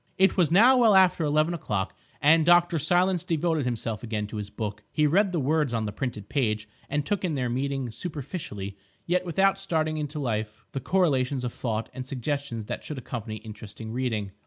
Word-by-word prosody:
It 190 +1 +4
was 175 -6 +3
now 240 +9 +6
well 225 -4 +6
after 185 -3 +5
eleven 155 +3 +2
o'clock, 105 - -2 0.3
and 160 +2 +6
Dr. 175 0 +4
Silence 180 +3 +2
devoted 160 -3 0
himself 115 -3 -2
again 110 -3 -3
to 105 +1 -7
his 105 -1 -5
book. 105 -1 -5
He 150 - +2
read 190 +6 +3
the 175 - 0
words 145 -2 +1
on 110 -1 -1
the 105 - -3
printed 105 -2 -4
page 110 -6 0 0.2
and 145 -1 -1
took 205 -2 -1
in 170 -5 0
their 125 -3 -1
meaning 135 0 -2
superficially, 130 - -5 0.3
yet 180 +1 0
without 195 +3 +2
starting 160 -5 -1
into 150 0 -4
life 110 -5 -3
the 135 - -3
correlations 140 -7 +1
of 125 - -3
thought 115 -2 -2
and 130 -1 -6
suggestions 135 -3 -3
that - - -5
should 150 - -6
accompany 115 -3 -5
interesting 110 0 -9
reading. 115 -5 -2
140 Hz, 190 wpm, -27 LUFS, 110-170 Hz, 0.3 s, now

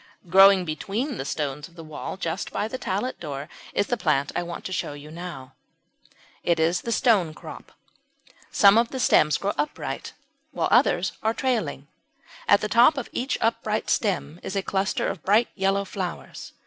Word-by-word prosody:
Growing 195 0 +7
between 210 - -3
the 135 - -3
stones 145 -1 -3
of 170 - -22
the 165 - -9
wall 155 +3 -6
just 170 0 -3
by 210 - -1
the 255 +3 -6
tallet 205 +7 -2
door 145 -3 -6 0.2
is - - +1
the 245 - 0
plant 150 - 0
I - - +1
want 170 0 -7
to - - -4
show 150 - -2
you 145 +1 -11
now. 170 -6 -8 0.9
It 170 -2 +1
is 165 +2 +2
the - - -6
Stonecrop. 200 -10 0 0.8
Some 205 +1 +6
of 235 0 +1
the 260 - -5
stems 155 -10 +4
grow 200 +1 -1
upright, 300 - -3 0.4
while - - 0
others - - +3
are 220 +1 0
trailing. 210 - -1 0.6
At 200 - +5
the 215 - -1
top 240 +7 +5
of 270 - -4
each 260 +3 -2
upright 220 -1 0
stem 180 -6 -1
is 190 - -5
a 195 - 0
cluster 190 0 -1
of 165 - -4
bright 210 +7 +3
yellow 195 0 0
flowers. 185 -2 -6
190 Hz, 175 wpm, -25 LUFS, 160-220 Hz, 0.9 s, Growing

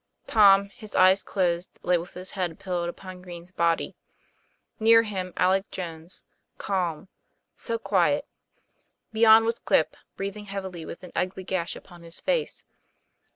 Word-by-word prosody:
Tom, 200 -2 +5
his 210 +1 -11
eyes 185 +1 +6
closed, 175 -2 -1
lay 180 - +3
with 175 +1 -4
his 185 +1 -7
head 180 -4 -3
pillowed 175 -2 -3
upon 185 +1 -9
Green's 175 -1 -10
body; 170 -2 0 0.8
near 230 +1 +6
him 190 -4 -4
Alec 190 +2 +2
Jones, 165 -1 -7 0.3
calm 180 -4 -2 0.5
so 465 - -2
quiet! - - +1 0.9
Beyond 220 0 +7
was 230 0 -1
Quip, - - +2 0.2
breath 195 +1 -4
ing 210 - -9
heavily 190 -4 -6
with - - -9
an 180 - -10
ugly 185 +1 -2
gash 180 -2 -2
upon 175 -2 -13
his 170 0 -13
face. - - -1
185 Hz, 145 wpm, -26 LUFS, 175-200 Hz, 0.9 s, Beyond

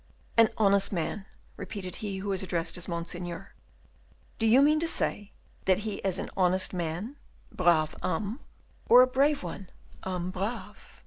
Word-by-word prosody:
"An 230 -1 +6
honest 200 -2 +3
man," 195 +3 -3 0.3
repeated 185 -4 -6
he 200 -3 -4
who 200 +1 -4
was 190 -2 +1
addressed 170 -3 -2
as 180 - -3
Monseigneur; 175 +1 -5 0.9
"do 225 - +2
you 250 +5 +6
mean 305 +1 +4
to 330 - 0
say 205 -9 0 0.3
that 190 +1 +3
he 210 -2 -3
is 190 -2 0
an - - -5
honest 185 0 +2
man 180 - -4 0.3
(brave 170 -4 +2
homme), 200 - -2 0.5
or 250 +2 +9
a - - +6
brave 275 +1 +2
one 180 +2 -7 0.3
(homme 180 -1 -3
brave)?" 200 +6 -6
195 Hz, 155 wpm, -28 LUFS, 175-220 Hz, 0.9 s, or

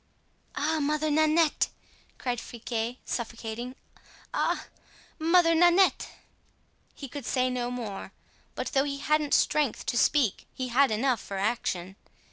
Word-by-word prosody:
"Ah! 315 +2 0
Mother 305 +1 0
Nanette!" 310 +1 +3 0.5
cried 245 -2 -2
Friquet, 235 0 -4
suffocating; 235 +1 -5 0.6
"ah! - - 0 0.5
Mother 330 +1 +4
Nanette!" 350 +3 +4 0.9
He 275 - -7
could 285 +2 -7
say 255 -1 +1
no 245 -1 -2
more; 225 -6 -5 0.4
but - - -3
though 270 -3 +3
he 280 -1 -3
hadn't 300 0 +2
strength 295 -6 +1
to 240 - 0
speak 270 -10 +2
he 255 -1 -3
had 270 +3 +4
enough 230 +2 +1
for 195 - -6
action. 190 -3 -2
260 Hz, 125 wpm, -28 LUFS, 235-305 Hz, 0.9 s, Mother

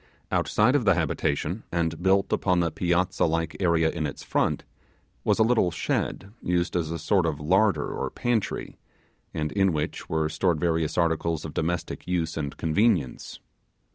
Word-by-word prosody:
Outside 120 +6 +2
of 140 - +2
the 95 -4 +4
habitation, 80 +3 -1
and 85 -1 -1
built 95 +1 +2
upon 90 -2 +2
the 85 -2 +1
piazza 90 +1 +1
like 80 -1 -1
area 85 -3 +3
in 75 - -2
its 70 - -8
front, - - 0 0.6
was - - +2
a 110 - +5
little 110 -5 +3
shed 100 +4 -2
used 90 0 0
as 85 -3 0
a 85 - -3
sort 85 +2 +2
of 75 -2 -2
larder 95 +1 +2
or - - -3
pantry, 120 -4 -2 0.5
and 75 0 -2
in 95 -2 +2
which 75 -1 -3
were 80 -1 +1
stored 80 +1 0
various 80 -2 0
articles 85 -2 0
of 75 - -6
domestic 85 +2 -3
use 85 -2 -1
and 70 -3 -4
convenience. 80 - 0
85 Hz, 165 wpm, -26 LUFS, 80-95 Hz, 0.6 s, a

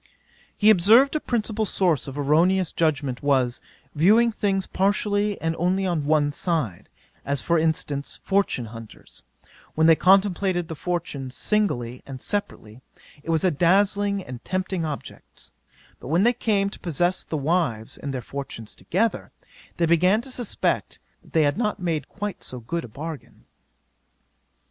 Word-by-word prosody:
'He 215 +1 +6
observed, 225 - +5
a - - +2
principal 220 -4 -2
source 180 -8 +1
of 135 +1 -7
erroneous 165 +5 +2
judgement 140 -6 -1
was, 130 -4 +1 0.3
viewing 215 +10 +4
things 195 -3 -1
partially 205 +1 0
and 165 0 -1
only 185 +3 +1
on 165 -6 -1
one 150 -1 +2
side: 145 - -2 0.3
as 140 0 -1
for 170 +4 +1
instance, 145 -6 -1
fortune 195 -11 +1
hunters, 115 -1 -11 0.5
when 160 - +3
they 165 0 +7
contemplated 190 -1 +2
the 160 - -5
fortunes 145 -6 -4
singly 125 - 0
and 135 -2 -7
separately, 125 - -4 0.4
it 165 - -11
was 160 -2 +1
a 185 - +3
dazzling 200 +5 +2
and 125 -6 -9
tempting 185 -2 -2
object; 150 -3 -8 0.5
but - - -10
when 165 +7 +2
they 240 +2 +4
came 200 -4 0
to - - -11
possess 175 +2 0
the 155 - -4
wives 140 -7 -1
and 140 - -6
their 130 -2 -4
fortunes 120 -4 -7
together, 220 +6 -1 0.5
they 170 - +2
began 180 +5 +3
to 265 - -8
suspect 245 -4 -2 0.2
that - - -22
they 160 - +4
had 145 +8 +1
not 215 -3 -1
made 160 -6 -2
quite 205 -2 -5
so 125 - -4
good 165 +9 -4
a - - -8
bargain. 150 +6 -9
170 Hz, 155 wpm, -24 LUFS, 145-200 Hz, 0.5 s, they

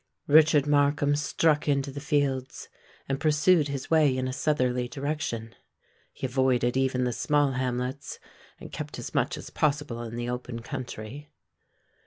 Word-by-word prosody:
Richard 150 -1 +5
Markham 145 0 +2
struck 150 +1 +1
into 140 -1 +1
the 140 - -6
fields, 140 -2 -1 0.4
and 135 0 -2
pursued 155 +1 +3
his 140 0 -5
way 150 -5 +4
in 130 0 -1
a 130 - -3
southerly 125 -4 0
direction. 135 -5 -4 0.6
He - - -6
avoided 125 -1 +1
even 130 -1 +1
the 125 -1 0
small 145 +2 +2
hamlets, 130 +1 -3 0.4
and - - -10
kept - - -6
as - - -7
much - - 0
as - - -9
possible 145 -5 -1
in 115 -1 -6
the 120 0 -3
open 125 -1 -5
country. 125 +4 -7
135 Hz, 150 wpm, -27 LUFS, 125-145 Hz, 0.6 s, Richard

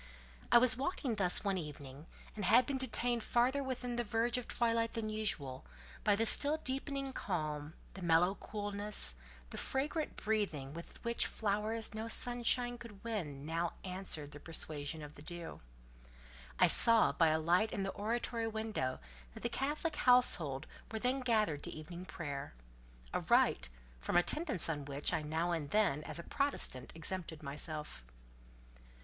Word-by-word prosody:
I - - +9
was 250 +1 +6
walking 275 -3 -2
thus 190 -4 +3
one 195 -2 0
evening, 145 -1 -9 0.3
and 210 - -4
had 245 +7 +5
been 270 0 -2
detained 240 -1 0
farther 255 +4 +2
within 250 -2 -3
the 240 - +1
verge 230 +2 0
of 245 - -9
twilight 230 -1 0
than 220 -1 -3
usual, 150 -12 -2 0.4
by 205 - +4
the 225 +2 +1
still 290 +6 +4
deepening 275 -1 -3
calm, 155 - -3 0.2
the 195 - -9
mellow 175 +2 +3
coolness, 205 - 0 0.4
the - - -5
fragrant 295 +4 -2
breathing 195 -11 -2
with 170 +1 -10
which 235 0 0
flowers 215 +2 -2
no 220 +1 -4
sunshine 245 +1 +1
could 225 -5 -12
win 160 -12 -4
now 165 +2 -2
answered 180 -6 -2
the 145 - -10
persuasion 155 -1 -2
of 150 0 -9
the 145 - -12
dew. 170 +1 -6 1.0
I - - +6
saw 230 -1 +8
by 165 - +3
a 155 0 +3
light 175 +7 +2
in 195 - -2
the 195 - -2
oratory 230 +2 -2
window 220 - -3 0.4
that - - -10
the - - 0
Catholic 300 +3 -2
household 165 - +3 0.3
were 220 - -3
then 250 +4 0
gathered 215 - +1
to - - -2
evening 170 +3 -8
prayer—a - - -7
rite, - - +2 0.3
from 60 - 0
attendance 270 - +2
on 145 -4 -3
which, 145 +4 0
I 160 - +1
now 160 +3 -1
and 160 -4 -2
then, 180 -8 +2
as - - -6
a 170 - -6
Protestant, 275 - -2
exempted 165 -1 -4
myself. 150 - -3
200 Hz, 155 wpm, -34 LUFS, 155-235 Hz, 1.0 s, I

